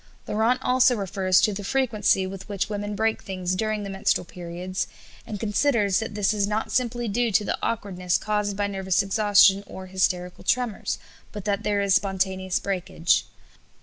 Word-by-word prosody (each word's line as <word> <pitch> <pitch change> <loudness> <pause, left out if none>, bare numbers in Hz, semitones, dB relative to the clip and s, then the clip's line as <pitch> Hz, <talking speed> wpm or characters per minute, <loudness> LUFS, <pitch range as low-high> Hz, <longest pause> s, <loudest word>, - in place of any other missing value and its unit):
Laurent 225 +4 +2
also 250 0 +4
refers 190 -2 +2
to 210 - +2
the 200 +1 -5
frequency 215 -5 +1
with 190 +1 -8
which 205 +1 -2
women 205 0 -3
break 220 +1 0
things 185 -2 -3
during 215 +2 -1
the 200 - -5
menstrual 195 -1 0
periods, 180 +2 -5 0.4
and 210 - -5
considers 210 -2 +2
that 220 -2 -5
this 205 0 +2
is 200 -1 +1
not 215 +1 -2
simply 240 -1 0
due 230 +2 0
to 210 +1 +2
the - - 0
awkwardness 185 -5 -1
caused 210 -2 -1
by 205 - +1
nervous 195 -1 0
exhaustion 200 -1 +4
or 190 - -8
hysterical 185 -1 -1
tremors, 250 -5 0 0.3
but 210 -3 -7
that 200 -1 0
there 205 -1 0
is 200 -1 +2
spontaneous 190 -1 0
breakage. 190 -2 0
200 Hz, 170 wpm, -25 LUFS, 190-215 Hz, 0.4 s, also